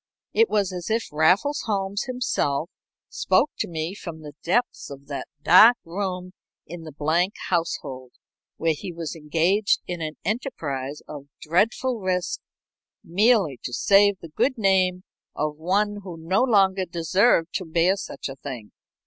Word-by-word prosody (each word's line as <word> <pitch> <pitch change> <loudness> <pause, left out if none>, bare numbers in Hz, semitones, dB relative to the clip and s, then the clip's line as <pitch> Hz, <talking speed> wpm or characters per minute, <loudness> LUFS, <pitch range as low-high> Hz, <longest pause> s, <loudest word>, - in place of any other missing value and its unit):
It 455 0 +4
was 200 -3 0
as 175 -2 -5
if 225 +1 0
Raffles 180 - +2
Holmes 200 -1 -1
himself 195 - -1 0.4
spoke 295 - +1
to - - -1
me 160 +1 -4
from 170 -5 -8
the 150 -1 -9
depths 240 +8 -1
of 140 0 -10
that 140 - -5 0.2
dark 220 +7 +8
room 180 +1 -4 0.3
in 165 0 -9
the 155 - -8
Blank 160 +7 0
household, 135 -7 -2 0.4
where 165 0 +1
he 185 +4 -7
was 165 -1 -6
engaged 165 +7 +1
in 175 -2 -5
an 155 -1 -4
enterprise 150 - -3
of 145 -2 -9
dreadful 225 +9 +1
risk 185 -2 -1 0.6
merely 195 - +2
to 125 - -6
save 200 +6 +4
the 165 - -9
good 255 - 0
name 185 -3 +2 0.3
of 150 0 -2
one 205 +6 0
who 180 -4 -8
no 170 +6 0
longer 195 -6 +3
deserved 170 +1 +2
to 185 - -2
bear 170 +3 +2
such 200 - -6
a 135 - -7
thing. 125 -7 -8
180 Hz, 150 wpm, -24 LUFS, 160-200 Hz, 0.6 s, dark